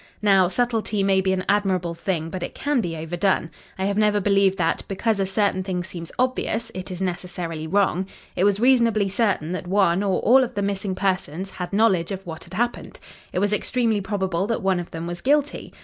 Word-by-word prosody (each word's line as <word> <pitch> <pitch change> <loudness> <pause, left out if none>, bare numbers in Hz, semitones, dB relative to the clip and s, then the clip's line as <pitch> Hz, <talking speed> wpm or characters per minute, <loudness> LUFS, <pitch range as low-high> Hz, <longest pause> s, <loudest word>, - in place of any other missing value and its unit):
"Now, 195 -3 +5
subtlety 225 -1 0
may 195 -1 +3
be 190 0 +1
an 185 -1 -1
admirable 190 -4 +1
thing, 165 -1 -3
but 185 - -5
it - - -5
can 285 -3 0
be 165 -5 -4
overdone. 170 +1 0 0.3
I 190 - -1
have 200 +1 0
never 210 -1 +3
believed 195 -1 +3
that, 165 -1 +1
because 210 +2 0
a 195 - +1
certain 195 -1 +1
thing 185 -2 -3
seems 170 -2 -8
obvious, 235 -2 -1
it 185 +1 -6
is 180 0 -6
necessarily 175 -3 -4
wrong. 190 0 +1 0.3
It 180 - +1
was 205 0 +3
reasonably 230 -5 +3
certain 195 -6 0
that 185 0 -4
one, 190 -1 +3
or 195 -2 +1
all 260 +3 +6
of 245 - -5
the 200 - -1
missing 195 -1 -2
persons, 185 -1 -2
had 180 -1 -6
knowledge 195 -4 +2
of 195 0 -5
what 160 -2 -7
had 180 - -10
happened. 240 +3 -2 0.3
It - - -4
was 205 +2 +1
extremely 225 0 +1
probable 190 -2 -1
that 230 -1 -2
one 190 -2 +2
of 175 - -6
them 165 0 -6
was 175 0 -5
guilty. 295 +1 0
195 Hz, 210 wpm, -23 LUFS, 180-210 Hz, 0.3 s, all